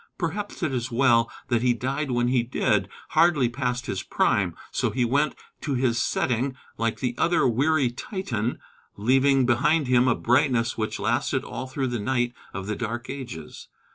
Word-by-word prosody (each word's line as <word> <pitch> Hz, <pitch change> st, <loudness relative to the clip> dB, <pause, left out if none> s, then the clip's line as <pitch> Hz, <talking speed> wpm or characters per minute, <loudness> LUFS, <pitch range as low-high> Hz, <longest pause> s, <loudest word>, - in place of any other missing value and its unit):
Perhaps 195 Hz, +3 st, -4 dB
it 155 Hz, -5 st, 0 dB
is 125 Hz, 0 st, -2 dB
well 120 Hz, -2 st, +3 dB, 0.2 s
that 120 Hz, -2 st, +2 dB
he 125 Hz, -1 st, +3 dB
died 135 Hz, +4 st, -2 dB
when 120 Hz, -1 st, +1 dB
he 125 Hz, -1 st, +3 dB
did, 120 Hz, +2 st, 0 dB, 0.2 s
hardly 165 Hz, -7 st, +4 dB
past 125 Hz, 0 st, -2 dB
his 95 Hz, -, -3 dB
prime. -, -, +1 dB, 0.2 s
So -, -, 0 dB
he 125 Hz, -1 st, 0 dB
went 145 Hz, +5 st, +1 dB, 0.3 s
to 140 Hz, -, -2 dB
his 120 Hz, -2 st, +1 dB
setting, 130 Hz, +3 st, 0 dB, 0.2 s
like 115 Hz, -1 st, -2 dB
the 125 Hz, -2 st, 0 dB
other 170 Hz, -5 st, +3 dB
"weary 135 Hz, +2 st, +2 dB
Titan," 120 Hz, -, -3 dB, 0.4 s
leaving 135 Hz, +4 st, +3 dB
behind 145 Hz, +6 st, +3 dB
him 125 Hz, 0 st, +3 dB
a 125 Hz, -, +3 dB
brightness 120 Hz, -1 st, +2 dB
which 110 Hz, -1 st, -3 dB
lasted -, -, 0 dB
all 130 Hz, -, -6 dB
through 130 Hz, 0 st, -2 dB
the 120 Hz, -1 st, -2 dB
night 120 Hz, +2 st, 0 dB, 0.2 s
of 100 Hz, -1 st, -5 dB
the 105 Hz, +1 st, -2 dB
Dark 120 Hz, +1 st, -4 dB
Ages. 120 Hz, -, -8 dB
125 Hz, 170 wpm, -25 LUFS, 120-135 Hz, 0.4 s, hardly